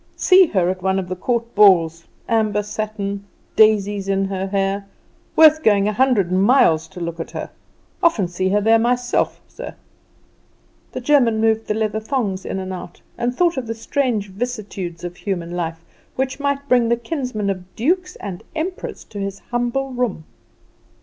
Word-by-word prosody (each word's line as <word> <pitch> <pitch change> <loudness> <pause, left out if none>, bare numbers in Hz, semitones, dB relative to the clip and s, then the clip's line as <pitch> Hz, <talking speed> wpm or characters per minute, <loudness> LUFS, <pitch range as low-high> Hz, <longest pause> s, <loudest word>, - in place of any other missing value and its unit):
See 370 -1 +6
her 185 - +1
at 185 -1 -6
one 190 +1 +1
of 185 -2 -3
the 185 - -2
court 235 +4 -2
balls 165 -5 +5 0.2
amber 215 -2 +1
satin 205 -1 -4 0.3
daisies 205 -2 +3
in 195 0 +1
her 195 0 -3
hair. 195 0 -1 0.5
Worth 315 0 +7
going 205 -4 +3
a 210 - 0
hundred 230 -7 +2
miles 185 - +4
to 190 - -11
look 170 -1 -4
at 165 - -5
her! - - -6 0.5
Often 225 - +2
seen 185 +2 -1
her 205 +1 +3
there 225 +2 +4
myself, 245 +1 0
sir!" - - -9 1.2
The - - -5
German 245 -5 +3
moved 220 0 +1
the 210 - 0
leather 220 0 -1
thongs 215 -5 -2
in - - -3
and 190 0 -4
out, 175 -1 -8 0.2
and 240 +1 -2
thought 345 -1 +2
of 250 -3 -3
the 225 - -3
strange 230 -3 -1
vicissitudes 200 -6 -5
of 175 0 -6
human 175 -4 -3
life, 165 -1 -4 0.3
which 265 +1 -2
might 280 0 -1
bring 245 -3 +3
the 235 - +3
kinsman 240 -6 -2
of 185 -1 -8
dukes 360 +9 0
and 185 -3 -7
emperors 360 +4 -4
to 205 - -9
his 195 0 -3
humble 245 +3 -1
room. 245 -10 -2
210 Hz, 170 wpm, -20 LUFS, 190-245 Hz, 1.2 s, Worth